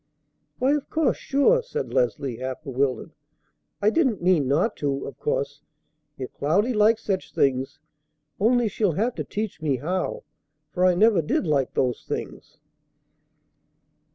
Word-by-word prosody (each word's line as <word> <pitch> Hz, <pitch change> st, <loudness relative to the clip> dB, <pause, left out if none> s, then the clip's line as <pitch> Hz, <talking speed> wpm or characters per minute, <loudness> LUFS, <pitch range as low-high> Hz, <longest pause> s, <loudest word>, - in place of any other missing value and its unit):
"Why, 260 Hz, +2 st, +2 dB
of 295 Hz, -2 st, -2 dB
course! 320 Hz, -2 st, +1 dB
Sure!" 370 Hz, -, +3 dB
said 465 Hz, -1 st, -5 dB
Leslie, 140 Hz, -, 0 dB
half 130 Hz, +3 st, -5 dB
bewildered. 135 Hz, -2 st, -2 dB, 0.7 s
"I 210 Hz, -, +5 dB
didn't 260 Hz, -, +2 dB
mean 175 Hz, -6 st, +2 dB
not 155 Hz, -, +1 dB
to, 140 Hz, -2 st, -2 dB
of 135 Hz, -, -9 dB
course, 140 Hz, 0 st, -2 dB, 0.6 s
if 130 Hz, -2 st, -6 dB
Cloudy 200 Hz, -, +1 dB
likes 220 Hz, +1 st, +3 dB
such 195 Hz, -2 st, -2 dB
things; 130 Hz, -1 st, +1 dB, 0.6 s
only 240 Hz, +3 st, +3 dB
she'll 205 Hz, -3 st, 0 dB
have 225 Hz, +9 st, 0 dB
to -, -, -4 dB
teach 210 Hz, -6 st, -5 dB
me 150 Hz, -4 st, +1 dB
how, 175 Hz, +8 st, -2 dB, 0.5 s
for 180 Hz, +1 st, +2 dB
I 180 Hz, -, +3 dB
never 210 Hz, -1 st, +4 dB
did 155 Hz, -, 0 dB
like 145 Hz, -4 st, 0 dB
those 125 Hz, -2 st, 0 dB
things." -, -, -6 dB
180 Hz, 145 wpm, -24 LUFS, 140-230 Hz, 0.7 s, I